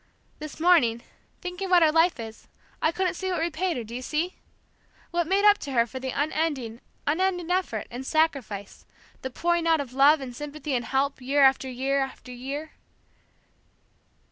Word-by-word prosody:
This 305 0 -8
morning, 285 -10 +4 0.4
thinking 360 +1 -4
what 355 -2 +6
her 310 - +5
life 330 -1 +3
is, 225 -1 -8 0.3
I 315 - +3
couldn't 370 +1 0
see 375 +2 -4
what 360 - -1
repaid 335 0 -1
her, 240 - -3
do 225 +1 -10
you 250 - -4
see? 320 +7 -1 0.8
What 345 -1 0
made 395 +3 +2
up 415 0 +7
to 280 - -6
her 235 -2 +4
for 250 +3 -7
the 260 0 -4
unending, 285 -5 -1 0.2
unending 355 +2 0
effort, 360 - 0
and 245 +2 -5
sacrifice, 265 -10 -1 0.3
the 260 - -4
pouring 340 +5 0
out 325 -1 +4
of 265 -3 -5
love 285 +3 +6
and 255 -3 -7
sympathy 295 +1 -5
and 240 -2 0
help 270 +3 0
year 275 +3 +3
after 265 0 +4
year 265 +2 0
after 265 -1 -5
year...." 275 +5 -6
290 Hz, 175 wpm, -26 LUFS, 255-340 Hz, 0.8 s, up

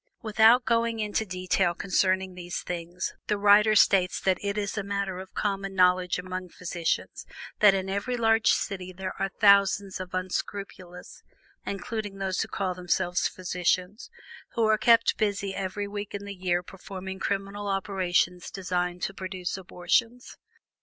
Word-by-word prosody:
Without 220 +3 +5
going 230 0 +1
into 210 0 -1
detail 185 -1 0
concerning 190 0 +1
these 175 0 -5
things, 175 0 -4
the 210 - +1
writer 210 +1 +5
states 190 -3 +4
that 185 -1 +1
it 200 0 -2
is 205 0 -2
a 205 - -1
matter 200 -2 -3
of 190 0 -11
common 195 -1 -2
knowledge 180 -1 +3
among 185 0 -5
physicians 170 -1 -3 0.4
that 205 -2 +7
in 190 0 -2
every 200 +6 -2
large 225 -1 +4
city 185 -2 -2
there 185 +1 -5
are 195 - +1
thousands 200 -1 +3
of 185 0 -6
unscrupulous 185 -1 -5 0.5
(including 205 0 -4
those 190 -1 -1
who - - -2
call 190 -2 -2
themselves 180 0 0
physicians) 180 +3 -2 0.5
who 230 - +2
are 215 0 +4
kept 230 -1 +4
busy 200 -2 0
every 195 +1 -3
week 205 0 -6
in 200 0 -6
the 200 - -6
year 180 -2 -1
performing 190 0 -8
criminal 200 +1 -3
operations 185 -2 0
designed 180 -2 -2
to 195 - -2
produce 185 -2 -4
abortions. 190 +6 -1
195 Hz, 150 wpm, -27 LUFS, 180-205 Hz, 0.5 s, that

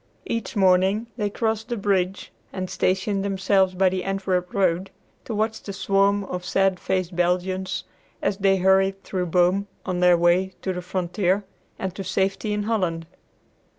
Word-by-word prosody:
Each 230 -2 -3
morning 190 +2 +3
they 210 -3 -1
crossed 220 +1 -2
the 240 - -2
bridge 195 -2 0 0.2
and 185 -1 -5
stationed 195 +2 0
themselves 190 -1 +2
by 190 0 +4
the 185 0 -3
Antwerp 190 -2 -1
road 190 -1 +1 0.4
to 225 - -4
watch 220 +1 -1
the 200 - -7
swarm 195 +1 +2
of 180 -2 -5
sad 190 0 +1
faced 185 -2 -2
Belgians 185 +2 0 0.4
as 195 - -1
they 195 -1 +3
hurried 190 +1 +3
through 180 -2 -2
Boom 180 +3 +2 0.2
on 185 -2 -2
their 180 -1 +5
way 175 +2 +2
to 190 - -1
the 180 - -4
frontier 185 +2 0 0.3
and 190 -2 -3
to 195 - -6
safety 195 +3 -1
in 210 0 -1
Holland. 185 -7 -1
190 Hz, 160 wpm, -24 LUFS, 180-200 Hz, 0.4 s, their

